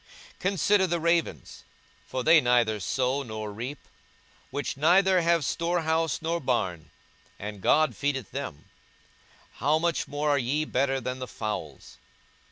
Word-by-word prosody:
42:012:024 - - -33
Consider 195 +1 +2
the 170 0 0
ravens: 165 - -1 0.4
for 130 - -3
they 160 +2 +6
neither 120 -4 +2
sow 130 +7 0
nor 110 -4 -6
reap; 125 +7 -5 0.7
which 145 +2 -3
neither 185 +5 +4
have 170 -3 +2
storehouse 165 -2 0
nor 165 +1 0
barn; 95 - -2 0.5
and 105 -1 -7
God 155 +10 +3
feedeth 135 -5 -2
them: 70 - -6 0.9
how 150 +2 +2
much 170 +1 0
more 145 +1 -1
are 140 - +3
ye 140 +5 0
better 135 -1 0
than 130 0 -4
the 130 - -5
fowls? 110 -2 -6
140 Hz, 140 wpm, -27 LUFS, 120-165 Hz, 0.9 s, they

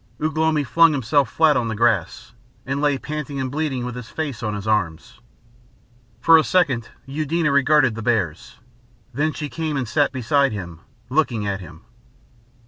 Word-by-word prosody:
Ugh 155 +1 -2
lomi 155 -1 +2
flung 165 +6 +4
himself 140 +1 +1
flat 155 -2 +3
on 120 -2 0
the 110 - -3
grass, 110 -2 0 0.3
and 140 +2 -2
lay 145 -2 +2
panting 150 -1 -5
and 130 -1 -3
bleeding 140 -4 -2
with 125 - -5
his 125 -2 -8
face 145 -7 -4
on 105 -2 -2
his 100 0 -6
arms. 95 -7 -1 1.0
For 165 -1 +6
a - - +2
second 135 -12 +1 0.2
Eudena 155 +2 -1
regarded 140 -2 +3
the 115 - -6
bears, 105 -9 -2 0.6
then 150 +5 0
she 150 -1 -5
came 155 -1 -3
and 130 -3 -2
sat 145 +5 +1
beside 140 0 +1
him, 85 -5 -7 0.3
looking 125 -7 +1
at 100 -1 -3
him.... 85 -2 -12
135 Hz, 170 wpm, -21 LUFS, 110-150 Hz, 1.0 s, For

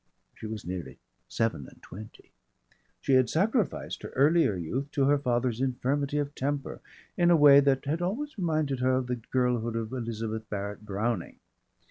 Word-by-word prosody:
She 110 - -8
was 110 -1 -6
nearly 90 -1 -6 0.3
seven 115 - -2
and - - -17
twenty. 105 +4 -12 0.7
She 135 - +1
had 130 -2 +4
sacrificed 210 - 0
her - - -7
earlier 145 - +4
youth 120 - -3
to 140 - +2
her 145 +1 +3
father's 125 -2 0
infirmity 135 +2 -1
of 145 -1 -2
temper 140 0 -3 0.4
in 175 -1 +4
a 175 - +6
way 145 -2 +8
that 140 -1 +2
had 155 +5 -1
always 245 +12 -3
reminded 155 - -1
her 130 0 +2
of 130 0 0
the 125 0 -2
girlhood 120 -1 -1
of 115 -1 -3
Elizabeth 110 -2 -4
Barrett 100 0 -5
Browning. 105 -1 -2
130 Hz, 165 wpm, -28 LUFS, 110-145 Hz, 0.7 s, way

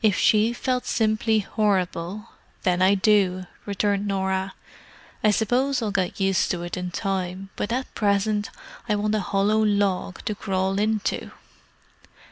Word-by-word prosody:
"If 210 -3 +4
she 215 +2 +4
felt 250 +1 -2
simply 220 -1 +2
horrible, 195 -1 -1 0.3
then 180 -2 +2
I 190 +2 +5
do!" 190 -2 +2 0.2
returned 200 0 0
Norah. 190 -1 -1 0.7
"I 215 - +5
suppose 250 +6 +1
I'll 220 -4 -2
get 190 -2 -1
used 195 -1 +2
to 175 -1 -2
it 175 - -4
in 180 0 -4
time, 190 +1 -3
but 205 - -3
at 255 +2 -2
present 205 0 +1 0.4
I 210 - +3
want 210 +1 0
a 215 - +2
hollow 205 +3 +1
log 200 -3 0
to 215 - -1
crawl 195 -1 -1
into!" 215 -1 -1
200 Hz, 145 wpm, -24 LUFS, 190-215 Hz, 0.7 s, I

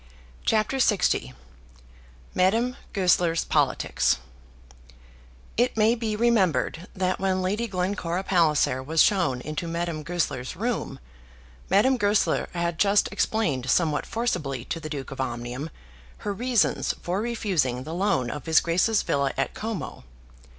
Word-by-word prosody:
CHAPTER 220 +4 +1
LX 210 - +2 1.0
Madame 225 +7 +2 0.2
Goesler's 180 -4 +2
Politics 60 0 +1 1.4
It 245 0 +1
may 220 +1 +4
be 225 -3 -2
remembered 185 - +1
that 185 0 0
when 185 -1 0
Lady 210 +5 -1
Glencora 185 -2 -2
Palliser 155 -8 +2
was 160 +4 +3
shown 170 -12 +1
into 155 +5 -4
Madame 170 -1 -3
Goesler's 150 -6 -2
room, 230 +5 -2 0.7
Madame 255 +6 +4
Goesler 205 -2 +1
had 170 -1 -1
just 200 0 +3
explained 145 - 0
somewhat 155 0 +2
forcibly 140 - -2
to 165 - -4
the 155 -1 -7
Duke 140 -3 -5
of 135 - -4
Omnium 120 +4 -4 0.6
her 205 - -1
reasons 240 +1 +1
for 180 +3 -1
refusing 185 - -1
the 155 - -6
loan 175 - 0
of 150 - -7
his 160 0 +6
Grace's 185 +6 +2
villa 140 -1 0
at - - -1
Como. 215 - -5
180 Hz, 130 wpm, -25 LUFS, 150-210 Hz, 1.4 s, his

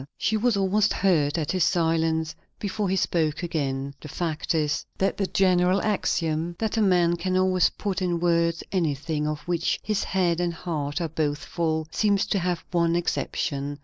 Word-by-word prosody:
She 220 - 0
was 220 0 +2
almost 200 +2 +2
hurt 160 -6 +2
at 155 -3 -1
his 185 -2 +1
silence, 160 -2 +1 0.2
before 205 -1 -2
he 190 - +1
spoke 165 -3 0
again. 140 -5 -2
The - - -8
fact 160 +1 -2
is, 150 -2 0
that 195 - +1
the 195 - 0
general 185 0 +3
axiom 170 -5 0
that 220 -1 -1
a 225 - +2
man 175 -4 +3
can 185 +2 -1
always 185 -1 +3
put 195 -2 -3
in 175 -2 0
words 170 -1 +1
anything 155 -3 -1
of 150 -1 -3
which 170 +1 -1
his 215 -2 0
head 175 -3 +1
and 175 -1 -1
heart 155 -2 -3
are 170 - 0
both 150 -2 -2
full, 160 -2 -1
seems 205 -2 +2
to 200 - +1
have 175 -1 -2
one 170 -1 +2
exception. 145 -4 -2
170 Hz, 180 wpm, -25 LUFS, 155-185 Hz, 0.2 s, general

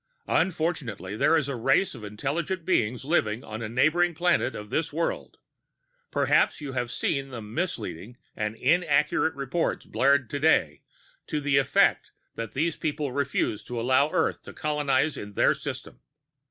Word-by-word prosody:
"Unfortunately, 155 - -1
there 165 +8 +4
is 150 -4 0
a 140 - -3
race 135 +10 +2
of 120 -5 -10
intelligent 150 - -3
beings 125 - +1
living 120 -7 +1
on 110 +1 -7
a 110 - -4
neighboring 155 +8 +2
planet 170 -6 +1
of 105 0 -8
this 160 0 0
world. 165 +3 -3 0.7
Perhaps - - +2
you 145 -3 -6
have 125 -2 -2
seen 135 +3 -2
the 125 -3 -6
misleading 115 - -4 0.2
and 105 0 -2
inaccurate 150 +2 +2
reports 140 +5 -2
blared 140 -1 +2
today 145 +6 +2 0.5
to 150 - -1
the 145 -1 +1
effect 135 - +2 0.2
that 115 -1 -6
these 160 +4 0
people 150 -3 -2
refuse 130 -6 -1
to 120 -1 -5
allow 130 +5 +3
Earth 165 -1 0
to - - -11
colonize 150 -1 0
in 105 0 -7
their - - +4
system. - - -7
140 Hz, 155 wpm, -26 LUFS, 120-160 Hz, 0.7 s, there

